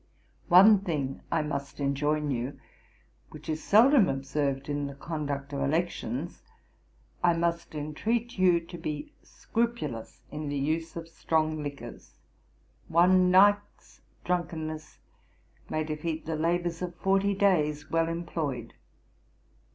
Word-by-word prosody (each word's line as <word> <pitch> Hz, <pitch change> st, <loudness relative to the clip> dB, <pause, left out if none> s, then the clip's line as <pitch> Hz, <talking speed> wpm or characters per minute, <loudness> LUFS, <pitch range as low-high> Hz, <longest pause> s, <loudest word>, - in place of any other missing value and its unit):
One 195 Hz, +4 st, +8 dB
thing 150 Hz, -8 st, -3 dB
I 160 Hz, -2 st, +1 dB
must 140 Hz, -2 st, -5 dB
enjoin 145 Hz, +2 st, 0 dB
you, 125 Hz, +2 st, -3 dB, 0.7 s
which 155 Hz, 0 st, -12 dB
is 155 Hz, 0 st, -3 dB
seldom 230 Hz, 0 st, +6 dB
observed 135 Hz, 0 st, -2 dB
in 145 Hz, -1 st, -2 dB
the 140 Hz, -, -8 dB
conduct 145 Hz, -2 st, -4 dB
of 140 Hz, -, -2 dB
elections; 150 Hz, -1 st, -2 dB, 0.8 s
I 175 Hz, -1 st, +5 dB
must 170 Hz, -1 st, -1 dB
entreat 220 Hz, +10 st, -2 dB
you 180 Hz, -2 st, +4 dB
to 170 Hz, +1 st, -10 dB
be 155 Hz, -, -5 dB
scrupulous 220 Hz, -, -3 dB
in 150 Hz, -1 st, -4 dB
the 145 Hz, -, -2 dB
use 160 Hz, +4 st, -1 dB
of 165 Hz, -1 st, -6 dB
strong 155 Hz, -1 st, -1 dB
liquors. 140 Hz, -5 st, -8 dB, 0.7 s
One 180 Hz, +2 st, +5 dB
night's 205 Hz, +2 st, +3 dB, 0.2 s
drunkenness 160 Hz, -3 st, -3 dB, 0.7 s
may 155 Hz, -, -1 dB
defeat 155 Hz, +1 st, -4 dB
the 160 Hz, 0 st, -2 dB
labours 170 Hz, +1 st, -1 dB
of 175 Hz, -1 st, -4 dB
forty 195 Hz, +2 st, +1 dB
days 150 Hz, -7 st, +1 dB
well 165 Hz, 0 st, +2 dB
employed. 160 Hz, -8 st, -4 dB
160 Hz, 120 wpm, -28 LUFS, 145-175 Hz, 0.8 s, One